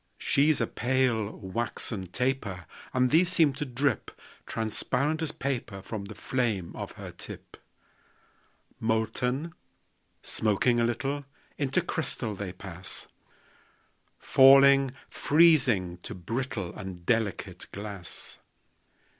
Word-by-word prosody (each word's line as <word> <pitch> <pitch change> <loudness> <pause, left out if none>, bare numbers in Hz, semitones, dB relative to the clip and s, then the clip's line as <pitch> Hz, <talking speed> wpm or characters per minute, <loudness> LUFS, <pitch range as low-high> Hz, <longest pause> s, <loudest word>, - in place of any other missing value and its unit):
She's 150 +2 +3
a 115 - +2
pale, 120 -3 +1
waxen 105 -1 -4
taper; 105 -4 -2 0.3
And 125 -1 +2
these 170 +3 +5
seem 165 -6 +4
to 150 +2 -3
drip 135 +2 0 0.4
Transparent 125 +8 -1
as 160 -2 -1
paper 125 -9 -3
From 105 -3 -5
the 105 +1 -9
flame 110 -9 -1
of - - -6
her - - -8
tip. - - -10 1.2
Molten, 125 +7 -1 0.7
smoking 110 +3 +2
a 115 - +3
little, 135 +4 -2 0.3
Into 140 -2 +2
crystal 120 -8 -2
they 100 -2 -5
pass; 90 -1 -6 1.1
Falling, 135 0 +7
freezing, 130 - +3
to - - -7
brittle 110 0 -3
And 90 -2 -8
delicate 110 -3 -1
glass. 100 -4 -7
120 Hz, 105 wpm, -28 LUFS, 100-135 Hz, 1.2 s, Falling